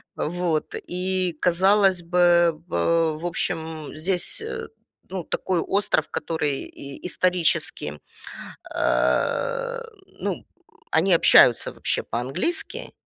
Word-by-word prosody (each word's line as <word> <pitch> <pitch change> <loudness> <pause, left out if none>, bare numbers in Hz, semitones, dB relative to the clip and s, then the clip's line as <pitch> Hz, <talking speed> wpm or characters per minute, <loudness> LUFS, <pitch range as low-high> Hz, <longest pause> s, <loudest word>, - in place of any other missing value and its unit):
Вот. 170 -1 -2
И, 185 0 -1
казалось 190 +1 +3
бы, 175 -1 +3
в 165 -2 +1
в - - -5
общем, 160 -3 -3
здесь, 180 - -1 0.7
ну, 185 -2 -5
такой 180 +2 -1
остров, 195 -3 0
который 150 -4 -2
и 140 +3 -10
исторически, 180 -1 0 0.8
э, - - 0 0.4
ну, - - -3 0.5
они 180 +4 +4
общаются 125 -7 +6
вообще - - -1
по-английски, 135 - -2
175 Hz, 90 wpm, -24 LUFS, 160-185 Hz, 0.8 s, общаются